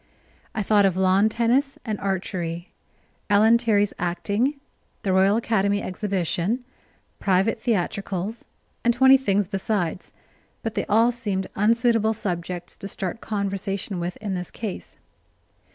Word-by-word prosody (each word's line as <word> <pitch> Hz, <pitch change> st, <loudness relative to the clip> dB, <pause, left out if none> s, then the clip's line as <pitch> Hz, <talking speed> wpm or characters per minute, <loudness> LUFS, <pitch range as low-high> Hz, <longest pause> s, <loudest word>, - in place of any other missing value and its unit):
I 215 Hz, -, 0 dB
thought 205 Hz, 0 st, +4 dB
of 185 Hz, -1 st, -1 dB
lawn 190 Hz, +3 st, +4 dB
tennis 245 Hz, +5 st, +1 dB
and 215 Hz, -3 st, -3 dB
archery. 175 Hz, -3 st, -3 dB, 0.6 s
Ellen 220 Hz, +3 st, +5 dB
Terry's 205 Hz, -4 st, +2 dB
acting, 200 Hz, +10 st, 0 dB, 0.5 s
the 190 Hz, -, +1 dB
Royal 195 Hz, +3 st, +4 dB
Academy 205 Hz, -3 st, +1 dB
Exhibition, 190 Hz, +3 st, -1 dB, 0.6 s
private 195 Hz, +4 st, +1 dB
theatricals, 200 Hz, 0 st, -2 dB, 0.4 s
and 235 Hz, 0 st, +3 dB
twenty 265 Hz, +1 st, +7 dB
things 205 Hz, -7 st, +1 dB
besides, 195 Hz, -3 st, -2 dB, 0.5 s
but 225 Hz, -, -2 dB
they -, -, -2 dB
all 225 Hz, +3 st, +4 dB
seemed 205 Hz, -6 st, -2 dB
unsuitable 225 Hz, +1 st, +3 dB
subjects 180 Hz, -4 st, -4 dB
to 195 Hz, -, -7 dB
start 195 Hz, +2 st, -4 dB
conversation 195 Hz, -2 st, -3 dB
with 175 Hz, +1 st, -4 dB
in 205 Hz, -3 st, -4 dB
this 180 Hz, -1 st, -4 dB
case. 215 Hz, -4 st, -6 dB
200 Hz, 125 wpm, -24 LUFS, 190-225 Hz, 0.6 s, twenty